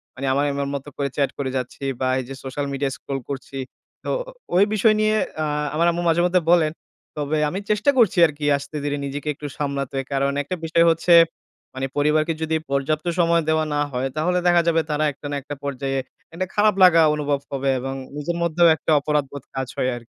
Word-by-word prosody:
মানে 135 - -5
আমার 140 +2 +1
আমার 140 0 -2
মতো 140 +1 -6
করে 140 -1 -1
চ্যাট 140 -2 +1
করে 135 -2 -2
যাচ্ছি 125 +2 -6 0.2
বা 130 - +1
এই 130 - -3
যে 135 - -6
সোশ্যাল 135 +2 -3
মিডিয়ায় 135 0 -1
স্ক্রল 135 -1 -5
করছি। 135 0 -6 0.5
তো - - -3 0.5
ওই 185 - +6
বিষয় 215 +1 +4
নিয়ে 215 0 +2 0.3
আ - - 0 0.3
আমার 170 +2 +3
আম্মু 175 +1 -3
মাঝে 165 +1 +3
মধ্যে 180 0 +2
বলেন, 165 -3 +4 0.5
তবে 150 +1 -1
আমি 185 - -3
চেষ্টা 210 +6 +3
করছি 225 -8 +4
আরকি 150 -1 -6
আস্তে-ধীরে 145 0 -4
নিজেকে 140 +2 -5
একটু 145 - -7
সামলাতে। 140 -2 -3
কারণ 140 0 +1
একটা 165 +6 -4
বিষয় 170 +1 +3
হচ্ছে 165 +2 +2 0.6
মানে 130 0 -2
পরিবারকে 155 +2 +2
যদি 160 0 0 0.2
পর্যাপ্ত 145 +3 0
সময় 170 -1 +3
দেওয়া 155 0 +2
না 145 - +1
হয়, 125 +2 -1
তাহলে 180 +4 +1
দেখা 175 -1 +5
যাবে 165 -1 +3
তারা 150 +1 0
একটা 145 - -15
না 145 - -2
একটা 145 +2 -7
পর্যায়ে, 135 -1 -2 0.3
একটা 185 +3 -2
খারাপ 210 0 +4
লাগা 170 -2 +7
অনুভব 145 -1 -1
হবে 135 0 -1
এবং 135 +1 -4 0.2
নিজের 170 +4 -3
মধ্যেও 170 0 +4
একটা 160 - -3
অপরাধবোধ 140 -2 -2
কাজ 130 -1 -2
হয় 130 - +1
আর 120 - -8
145 Hz, 200 wpm, -22 LUFS, 140-170 Hz, 0.6 s, লাগা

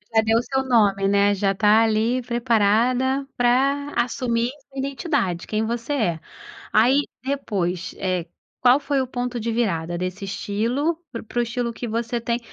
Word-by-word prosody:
Já 220 - +6
deu 225 +1 +2
seu 265 +1 -1
nome, 205 -6 +3
né, 200 0 +3
já 195 0 +1
está 210 +3 +4
ali 225 +3 +1
preparada 245 +3 +1
para 275 +4 +2
assumir 235 -1 -1 0.2
sua 270 - -8
identidade, 270 - -1
quem 215 +1 -1
você 235 +4 -3
é. 190 - 0 0.5
Aí 255 +7 +5 0.2
depois 190 -10 -2
eh, 185 -3 -1 0.4
qual 250 +2 +6
foi 280 -1 0
o 260 - -3
ponto 245 0 -3
de 230 +1 -2
virada 175 -7 -1
desse 185 +3 -4
estilo 230 - -1 0.2
pr 230 - -6
para 240 +2 -4
o - - +4
estilo 235 0 -3
que 240 - -5
você 235 +1 -2
tem 235 +1 -1
235 Hz, 165 wpm, -23 LUFS, 205-255 Hz, 0.5 s, Já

